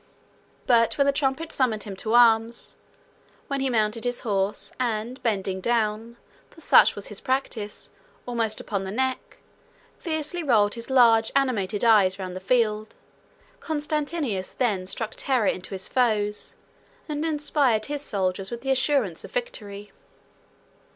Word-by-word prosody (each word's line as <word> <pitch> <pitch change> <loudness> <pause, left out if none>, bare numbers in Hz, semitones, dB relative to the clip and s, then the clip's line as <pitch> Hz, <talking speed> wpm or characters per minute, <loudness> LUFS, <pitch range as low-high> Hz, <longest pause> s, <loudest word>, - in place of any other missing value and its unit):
But 230 -2 +3
when 280 - +3
the 280 - +3
trumpet 280 +3 -1
summoned 230 -6 0
him 200 -2 -7
to 220 +4 -1
arms; 230 -1 +3 0.7
when 275 -1 -2
he 270 0 0
mounted 220 -1 0
his 245 0 -2
horse, 200 -2 -2
and, 235 +1 -2
bending 195 -4 -1
down 225 +1 -1 0.3
(for - - -18
such 325 - +5
was - - -6
his - - -5
singular 260 - +1
practice) 210 -6 -8 0.3
almost 230 -3 -1
upon 200 -2 -3
the 190 - -5
neck, 260 +5 -2 0.6
fiercely 315 +1 -3
rolled 215 -9 +3
his 230 +1 -7
large 230 -4 +5
animated 220 -7 0
eyes 205 -5 +5
round 185 -2 -6
the - - -4
field, 215 +1 0 0.6
Constantius 295 - -2
then 205 -8 0
struck 225 +3 -3
terror 255 -5 +1
into 185 -1 -1
his 190 -1 -2
foes, 210 -4 0 0.5
and 300 -1 -3
inspired 290 -7 +1
his 290 -1 -4
soldiers 190 -5 -2
with 235 0 -6
the 270 +1 -1
assurance 260 - +1
of - - -9
victory. 210 - -5
230 Hz, 145 wpm, -25 LUFS, 210-270 Hz, 0.7 s, such